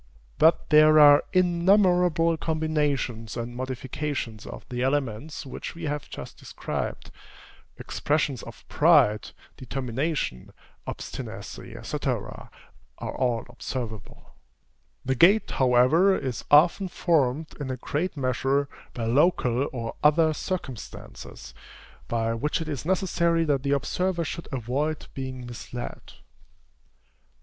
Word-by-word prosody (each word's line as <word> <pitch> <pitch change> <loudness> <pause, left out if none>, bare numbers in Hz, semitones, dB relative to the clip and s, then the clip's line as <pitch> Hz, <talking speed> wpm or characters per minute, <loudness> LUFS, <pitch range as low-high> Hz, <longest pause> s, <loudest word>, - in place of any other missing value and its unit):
But 160 +1 +4
there 155 0 +7
are 145 -1 +8
innumerable 180 -2 +3
combinations 150 -8 -1
and 120 +1 -5
modifications 130 -2 -4
of - - -9
the 125 -1 -3
elements 140 +2 -2
which 135 - -7
we 170 - -9
have 150 -2 -3
just - - -9
described. - - -5 0.7
Expressions 145 -3 -1
of 115 - -12
pride, 145 - +4 0.3
determination, 130 - -3 0.3
obstinacy, - - -7
&c., - - -3
are - - -3 0.7
all 120 -3 0
observable. 120 -3 -7 0.7
The 130 - +1
gait, 190 - +4
however, 130 +10 +4
is 130 -4 -4
often 170 +6 +5
formed, 155 -4 +1
in 140 -2 -4
a 130 - -3
great 155 +7 -3
measure, 135 +2 0 0.3
by 115 - -3
local 135 0 +2
or 115 -3 -4
other 155 +1 +4
circumstances, 155 - -7 0.5
by 115 -1 0
which 150 +9 -1
it 160 - -5
is 145 -3 -4
necessary 170 -2 +1
that 145 -3 +1
the 140 +1 0
observer 175 +5 0
should 170 +3 -6
avoid 135 +5 -2
being 130 -2 -6
misled. 120 0 -8
145 Hz, 110 wpm, -26 LUFS, 125-165 Hz, 0.7 s, are